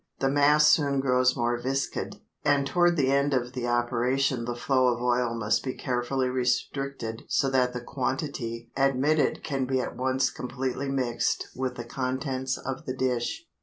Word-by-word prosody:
The 135 0 +1
mass 145 +1 +5
soon 140 -3 +3
grows 130 -1 +3
more 120 0 0
viscid, 135 +2 -2 0.3
and 145 -1 +3
toward 175 +4 +3
the 135 -2 +2
end 140 0 +2
of 125 0 -1
the 125 -2 -3
operation 120 +1 +1
the 120 0 -3
flow 130 +1 +2
of 120 -1 +1
oil 120 -1 +1
must 110 -1 0
be 130 - -3
carefully 130 +1 -1
restricted 125 -1 -2
so 135 - +1
that 125 -2 +2
the 125 - -4
quantity 125 -3 -3
admitted 135 +2 +2
can 135 -3 -1
be 130 0 0
at 125 - -4
once 130 +1 +1
completely 130 +2 -3
mixed 130 -3 -1
with 130 -1 -2
the 120 - -6
contents 130 +1 -2
of 135 0 -6
the 130 - -2
dish. 130 - -1
130 Hz, 165 wpm, -27 LUFS, 125-135 Hz, 0.3 s, mass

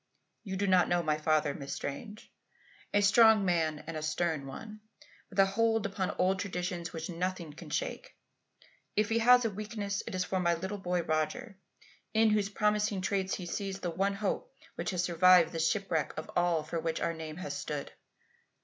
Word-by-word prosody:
You 190 -3 -4
do 200 - 0
not 185 -2 +4
know 175 0 +2
my 155 -1 0
father, 155 -2 +2
Miss 140 -1 -6
Strange. 210 +10 -7 0.6
A 205 - +3
strong 220 0 +6
man 160 -4 0
and 165 +1 -6
a 155 - -3
stern 155 -2 -1
one, 215 +10 -8 0.5
with 195 - -13
a 195 - +7
hold 225 +2 +1
upon 195 -2 -2
old 190 +1 +2
traditions 180 -3 -3
which 160 -1 -5
nothing 175 -2 -3
can - - -11
shake. - - -4 0.8
If 210 +1 +2
he 230 0 +2
has 245 +1 +6
a 225 - 0
weakness 205 -1 -4
it - - -4
is 185 - +1
for 185 +1 -1
my 170 -1 +2
little 190 +4 -5
boy 180 -2 -1
Roger 165 +9 -2 0.6
in 220 0 +5
whose 210 -2 +1
promising 210 -1 +1
traits 195 -1 0
he 180 - -6
sees 195 +2 -4
the 175 - -2
one 195 +4 0
hope 215 - -2 0.2
which - - -3
has 180 -2 -1
survived 175 -1 +5
the 165 - -4
shipwreck 165 -1 0
of 155 - -6
all 175 -3 +2
for 165 +2 -3
which 160 0 -2
our 165 - 0
name 160 -1 -7
has 145 -6 -5
stood. 145 0 -4
185 Hz, 190 wpm, -31 LUFS, 165-205 Hz, 0.8 s, a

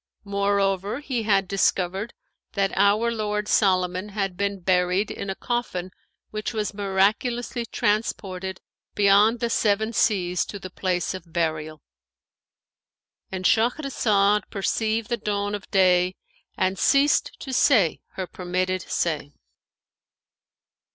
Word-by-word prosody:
Moreover, 200 +1 0
he 265 -5 -2
had 200 -3 +2
discovered 195 +2 0 0.4
that 195 -1 0
our 205 +4 +3
lord 210 -2 -2
Solomon 185 -1 +2
had 195 -3 -2
been 200 +1 -2
buried 180 +2 +1
in 200 - -5
a 190 - -2
coffin 215 -7 -3 0.4
which 215 +2 -4
was 210 -1 -2
miraculously 215 +5 0
transported 190 -4 -2 0.4
beyond 210 +3 +4
the 235 - 0
Seven 220 +1 +1
Seas 180 -6 +1
to 205 - -6
the 185 -2 -9
place 180 -1 -1
of 175 -3 -9
burial;"—And 160 +3 -8
Shahrazad 220 -5 +2
perceived 220 +2 -1
the 240 - 0
dawn 205 -1 -2
of 205 -2 -6
day 185 -1 +3 0.4
and 185 0 0
ceased 280 +1 +3
to 265 - -6
say 225 - +3
her 190 - -4
permitted 185 +1 -2
say. 150 -5 -2
200 Hz, 115 wpm, -24 LUFS, 185-215 Hz, 0.4 s, beyond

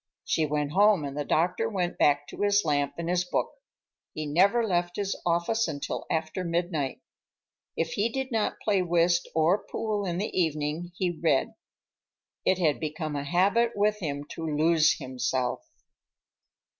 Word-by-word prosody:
She 155 -1 +1
went 150 -1 -1
home, 200 -3 +4
and 140 0 -5
the 145 - -2
doctor 180 +10 +1
went 180 -4 -2
back 145 0 +3
to - - -8
his 205 -2 +3
lamp 145 -2 0
and 170 0 -4
his 180 0 +1
book. 180 - -1 0.6
He 155 - -3
never 195 +10 +3
left 175 -3 0
his 200 -1 -2
office 175 +7 +1
until 145 -3 -4
after 160 +2 -2
midnight. 170 -5 -2 0.8
If 165 0 -1
he 210 +3 0
did 265 +2 -4
not 220 -2 -1
play 200 -3 +2
whist 175 0 +2
or 165 +5 +3
pool 210 -3 -3
in 175 -1 -2
the 205 +4 -3
evening, 160 0 -1
he 180 -2 0
read. 160 -5 +1 0.9
It 185 - +3
had 160 -5 +1
become 155 0 -4
a 140 - -2
habit 200 +10 +2
with 210 +1 +1
him 145 -6 -3
to 165 - -7
lose 155 +1 +3
himself. 130 -1 -2
170 Hz, 160 wpm, -27 LUFS, 150-195 Hz, 0.9 s, home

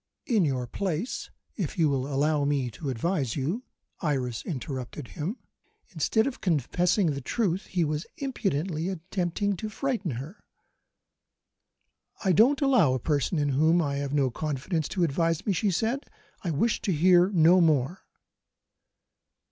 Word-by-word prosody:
In 220 -7 +2
your 130 -4 -1
place, 185 - -3 0.3
if 185 -8 -3
you 165 -3 +4
will 135 0 -1
allow 145 +2 +2
me 140 -4 0
to 140 +5 -5
advise 135 0 -1
you 155 - -1 0.2
" - - -36
Iris 125 -4 -2
interrupted 130 -3 -5
him. 180 - -4 0.5
Instead 215 +6 +1
of 275 - -4
confessing 175 - +2
the 140 -1 -4
truth, 190 - -1
he 175 -3 0
was 150 +1 -2
impudently 185 - -2
attempting 185 +2 -2
to 215 - -4
frighten 215 - -2
her. 150 - -9 1.8
"I 190 - +4
don't 245 - +4
allow 240 - +4
a - - -1
person 150 +5 0
in 145 -1 +1
whom 160 +5 +3
I 140 -4 0
have 140 -1 -3
no 140 -3 +2
confidence 155 +3 -2
to 180 - -1
advise 165 +1 0
me," 205 - +2
she 205 +3 +1
said; 225 - -1 0.4
"I 180 - -1
wish 190 +9 +1
to 195 - 0
hear 180 +3 +5
no 180 -1 +5
more." 155 +1 +2
165 Hz, 150 wpm, -27 LUFS, 140-195 Hz, 1.8 s, hear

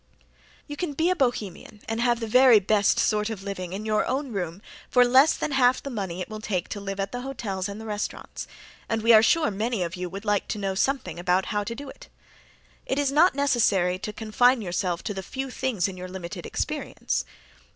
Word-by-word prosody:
You 290 - -7
can 315 -1 -3
be 325 +5 +1
a - - +1
Bohemian 220 - -2
and 225 +1 -2
have 240 -1 +2
the 230 - -3
very 250 0 +6
best 200 +1 +2
sort 210 0 +1
of 210 -4 -6
living 185 -3 -5
in 200 +3 -5
your 215 -1 +2
own 265 +1 -2
room 185 -1 -4 0.3
for 250 -1 +5
less 265 +5 +5
than - - -2
half 255 -2 +3
the 275 - -5
money 190 -6 -4
it - - -4
will 215 -1 -7
take 185 -5 -2
to 205 - -4
live 195 0 -5
at 195 0 -2
the 245 - -4
hotels 205 -8 -4
and 215 +2 -7
restaurants, 210 -1 -5 0.4
and 225 -1 -1
we 230 0 +6
are 215 - +9
sure 325 0 +3
many 215 0 -1
of 170 0 -4
you 180 0 -4
would 195 +4 -8
like 205 -2 +1
to - - -3
know 195 -2 -2
something 190 - -1
about 180 +2 +1
how 205 0 0
to 230 +3 -5
do 285 +3 -8
it. - - -12 0.8
It 265 - -1
is 285 -1 +1
not 310 +3 +5
necessary 210 -10 +2
to 210 - -4
confine 225 +3 +2
yourself 180 -1 -2
to 205 - -3
the 190 - -4
few 265 +6 -5
things 245 -9 -1
in 190 -1 -7
your 180 0 -6
limited 180 -2 -7
experience. - - -2
215 Hz, 220 wpm, -26 LUFS, 195-255 Hz, 0.8 s, are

